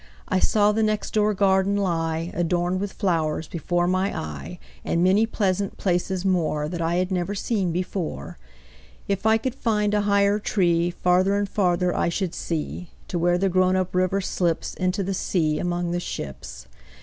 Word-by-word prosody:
I 185 - +1
saw 210 +2 +3
the 220 +1 0
next 215 -1 -1
door 210 -1 +2
garden 190 0 +3
lie, 165 -3 -1
Adorned 175 +1 0
with 200 -1 -3
flowers, 160 -4 -1
before 175 +2 -1
my 185 +2 0
eye, 75 -3 -6 0.3
And 170 - 0
many 200 +5 +4
pleasant 200 -3 -1
places 180 0 -1
moreThat 170 -3 0
I 165 +1 0
had 185 +1 0
never 185 +2 -1
seen 195 -3 -1
before. 175 - -4 0.7
If 200 +2 0
I 220 0 +5
could 255 +2 -3
find 210 -5 0
a 210 - +3
higher 200 0 +3
treeFarther 180 0 +2
and 205 0 0
farther 180 -3 +1
I - - +1
should 180 0 -2
see, 165 +2 -4 0.2
To 175 - -2
where 175 +1 +2
the 195 +2 +1
grown 185 0 +3
up 185 -1 -1
river 185 +2 +1
slipsInto 185 +2 -1
the 195 - -1
sea 160 -5 0
among 175 0 -1
the 175 - -1
ships. 65 - -7
185 Hz, 165 wpm, -24 LUFS, 175-200 Hz, 0.7 s, I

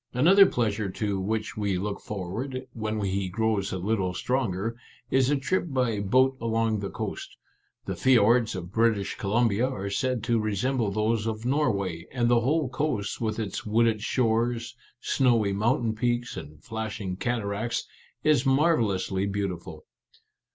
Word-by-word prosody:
Another 190 +9 +7
pleasure 110 - -1
to 100 +1 -2
which 110 +3 -2
we 100 -3 0
look 100 +2 -3
forward, 115 +7 -5
when 110 -1 -3
he 95 -1 -1
grows 110 -1 0
a 95 - -2
little 95 -1 -1
stronger, 115 -3 -1 0.4
is 130 0 +3
a 145 - +3
trip 145 +8 0
by 125 -7 0
boat 130 +7 +3
along 115 -1 +1
the 100 -1 -4
coast. - - -6 0.5
The - - -3
fiords 120 -3 +4
of 90 -1 -6
British 110 -2 +1
Columbia 115 +3 +2
are 100 -6 -4
said 125 +1 -1
to 115 -1 +2
resemble 110 +3 0
those 110 +2 0
of 110 0 -3
Norway, 100 - 0
and 120 -2 +1
the 120 -1 +5
whole 145 +4 +1
coast, 125 -6 -2
with 110 -1 -1
its 105 -4 -3
wooded 110 0 +2
shores, 115 0 0 0.3
snowy 115 -7 +2
moun 115 +5 +1
tain 110 -1 0
peaks, 120 +1 -1
and 75 +1 -9
flashing 110 -5 -4
cataracts, 115 +1 -2 0.4
is 150 -5 +4
marvel 140 -2 +3
lously 95 0 -1
beautiful." 100 -3 -4
110 Hz, 150 wpm, -27 LUFS, 100-125 Hz, 0.5 s, Another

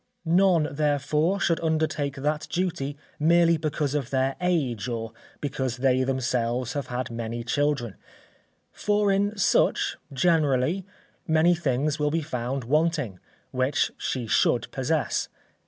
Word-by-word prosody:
None, 170 -2 +3
therefore, 150 +5 +1
should 170 -4 +1
undertake 155 -3 -1
that 150 +2 -2
duty 170 -6 -2 0.2
merely 170 +2 +4
because 150 -2 -2
of 140 -4 -2
their 135 0 0
age 135 - 0
or 115 -2 -4 0.3
because 135 -3 -2
they 130 0 +2
themselves 125 -2 -1
have 140 -3 -3
had 125 0 -4
many 115 0 -4
children, 140 -4 0 0.8
for, 205 -1 +1
in 205 +2 +1
such, 195 - +2
generally, 155 +3 +1 0.4
many 160 +2 +4
things 150 -2 0
will 150 0 +2
be 160 +1 -1
found 130 -2 -3
wanting, 150 - 0 0.3
which 130 +2 +1
she 125 -3 -3
should 110 - +2
possess. - - -1
145 Hz, 125 wpm, -26 LUFS, 130-165 Hz, 0.8 s, merely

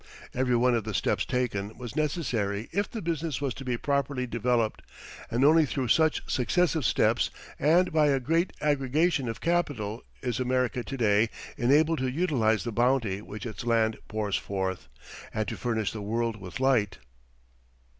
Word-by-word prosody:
Everyone 125 -1 +2
of 115 -2 +1
the 110 -1 -4
steps - - +1
taken 110 -5 -2
was 120 -3 -7
necessary 120 - -1
if 205 0 -1
the 225 - -6
business 165 -4 -2
was 140 -3 -1
to 135 - -9
be 125 -2 -1
properly 140 -1 -1
developed, 120 -1 0 0.5
and 120 +4 +2
only 160 +2 +6
through 135 -4 -2
such 160 +5 +3
successive 160 +2 +1
steps - - +2 0.3
and 170 +4 +3
by 155 -2 +4
a 140 -2 +3
great 165 +7 +1
aggregation 145 0 +1
of 115 - -6
capital 140 -10 -1 0.2
is 125 -2 -1
America 125 0 0
to 135 - -6
day 110 -1 +3 0.3
enabled 150 +6 +3
to 130 - 0
utilize 125 -8 +1
the 120 - -3
bounty 115 -4 +1
which 105 +1 -8
its 115 +1 -6
land 115 -2 +2
pours 105 -2 -2
forth, 95 -6 -3 0.5
and 110 0 -1
to - - -3
furnish 110 -4 -1
the 110 - -6
world 115 +2 -1
with 90 +4 -7
light. 125 -7 +2
125 Hz, 165 wpm, -28 LUFS, 110-145 Hz, 0.5 s, only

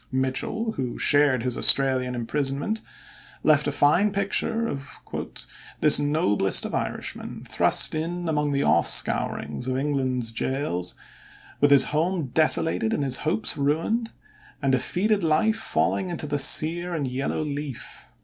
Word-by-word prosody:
Mitchel, 130 - -2
who 125 -3 -4
shared 145 -4 +3
his 125 -1 0
Australian 130 -2 +2
imprisonment, 140 - -2 0.6
left 150 -1 +3
a - - 0
fine 175 +9 +2
picture 210 +4 -1
of 140 -5 -8 0.8
"this 150 - +6
noblest 105 - +3
of - - -6
Irishmen, - - -5
thrust - - +3
in 170 +2 -4
among 150 -2 -1
the 140 0 0
off 80 +2 +2
scourings 75 - -1
of 130 0 -2
England's 130 -4 -1
gaols, 115 - -2 0.6
with 145 - +3
his 140 -2 +8
home 165 -1 -1
desolated 160 -7 +2
and 145 - -2
his 130 -2 0
hopes 160 +8 -1
ruined, 165 +12 -1 0.5
and 135 -2 0
defeated 195 - 0
life 165 +8 +1
falling 190 -4 -1
into 170 -3 -5
the 145 0 -2
sere 170 +5 +3
and 145 -4 -3
yellow 135 +4 -3
leaf. 145 -3 -7
145 Hz, 140 wpm, -24 LUFS, 130-165 Hz, 0.8 s, his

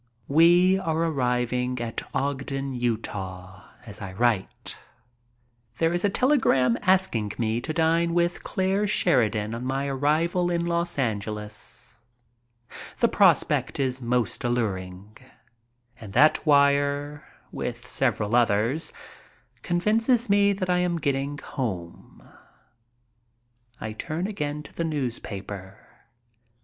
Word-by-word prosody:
We 175 +5 +5
are 160 -4 -1
arriving 125 -5 0
at 115 -1 -3
Ogden, 135 0 -2
Utah, 100 -6 -4 0.2
as 105 -1 -7
I 95 -2 -6
write. 110 -2 -1 1.0
There 165 +1 +1
is 175 - -1
a 205 - +3
telegram 195 - +3
asking 180 - +1
me 115 0 -1
to 145 - -3
dine 165 +1 +1
with 175 0 0
Clare 195 +2 0
Sheridan 115 - +2
on 115 +1 -5
my 135 +2 -1
arrival 155 +6 +1
in 170 -1 0
Los 170 -1 -1
Angeles. 105 - -4 1.0
The - - +4
prospect - - +2
is 130 -1 -1
most 120 0 -1
alluring. 105 -4 -3 0.8
And 105 -4 -10
that 155 - +4
wire, 145 0 +2 0.3
with - - -5
several 105 +3 0
others, 120 +6 +2 0.7
convinces 225 +7 +1
me 200 0 +4
that 190 -2 -2
I 180 0 +2
am 175 -1 0
getting 140 -1 -1
home. 100 - -6 1.5
I 110 - -5
turn 160 +10 -4
again 150 -7 -3
to - - -14
the 170 - -3
newspaper. 105 - -5
135 Hz, 115 wpm, -25 LUFS, 115-170 Hz, 1.5 s, We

